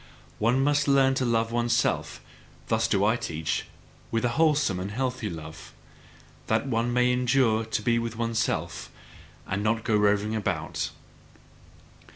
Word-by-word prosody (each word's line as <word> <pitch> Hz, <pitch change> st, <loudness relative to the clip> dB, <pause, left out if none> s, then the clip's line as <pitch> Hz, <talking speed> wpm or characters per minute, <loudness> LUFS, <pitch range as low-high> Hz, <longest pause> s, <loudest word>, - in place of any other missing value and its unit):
One 120 Hz, +5 st, +2 dB
must 145 Hz, 0 st, +2 dB
learn 135 Hz, -1 st, +4 dB
to 130 Hz, -1 st, 0 dB
love 115 Hz, -1 st, +1 dB
oneself 120 Hz, 0 st, 0 dB, 0.5 s
thus 110 Hz, 0 st, +2 dB
do 100 Hz, -2 st, +2 dB
I 110 Hz, +3 st, +3 dB
teach 80 Hz, -5 st, -3 dB, 0.4 s
with 115 Hz, +1 st, 0 dB
a -, -, +2 dB
wholesome 145 Hz, -, +2 dB
and 95 Hz, +2 st, -4 dB
healthy 125 Hz, 0 st, -2 dB
love: 80 Hz, -2 st, -9 dB, 0.7 s
that 110 Hz, +2 st, +1 dB
one 120 Hz, -2 st, 0 dB
may 125 Hz, 0 st, +3 dB
endure 125 Hz, -3 st, +2 dB
to 110 Hz, -1 st, -2 dB
be 115 Hz, 0 st, +2 dB
with 115 Hz, -1 st, -4 dB
oneself, 115 Hz, 0 st, -2 dB, 0.6 s
and 100 Hz, +1 st, -2 dB
not 110 Hz, +1 st, 0 dB
go 110 Hz, -, +1 dB
roving 105 Hz, +1 st, +2 dB
about. 110 Hz, -, -2 dB
115 Hz, 145 wpm, -26 LUFS, 110-125 Hz, 0.7 s, learn